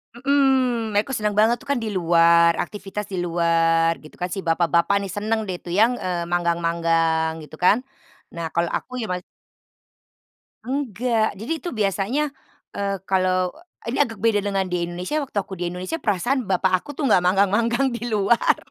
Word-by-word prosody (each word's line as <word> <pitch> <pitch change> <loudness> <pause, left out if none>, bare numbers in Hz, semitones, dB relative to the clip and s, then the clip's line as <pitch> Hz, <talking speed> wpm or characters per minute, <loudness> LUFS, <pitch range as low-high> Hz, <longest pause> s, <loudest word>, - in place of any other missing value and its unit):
Hmm, 255 -4 +1
mereka 210 +6 +1
senang 210 -5 -1
banget 225 +3 +3
tuh - - -17
kan 280 -1 +1
di 215 - -3
luar, 170 -2 +4
aktivitas 205 +2 -6
di 185 - -2
luar 165 -1 +2
gitu 155 - -15
kan. 180 - -4
Si 195 - -3
bapak-bapak 170 +2 +2
nih 195 - -5
senang 215 +3 -1
deh 185 - -3
itu - - -11
yang, 240 +3 +3
eee, 180 -2 -2
manggang-manggang 165 -2 +1
gitu 150 - -12
kan. 205 +7 +4 0.5
Nah, 170 - -4
kalau 170 +1 +2
aku - - -4
ya 230 - -2
ma 180 - 0 1.5
Enggak, 240 -5 -1
jadi 220 +9 -6
itu 355 - -4
biasanya, 220 - -1 0.4
eee, 200 -1 -2
kalau 185 -1 +1 0.3
ini 235 - 0
agak 225 -2 -1
beda 210 0 +2
dengan 195 -1 -1
di 180 -1 -2
Indonesia. 180 - -3
Waktu 265 -6 -8
aku 195 -1 -2
di 175 -1 -3
Indonesia 185 - -5
perasaan 240 +6 0
bapak 185 -1 +2
aku - - -18
tuh 295 - -1
nggak 210 - +4
manggang-manggang 210 +8 +2
di 240 0 -4
luar. 215 +1 +2
195 Hz, 170 wpm, -22 LUFS, 175-230 Hz, 1.5 s, luar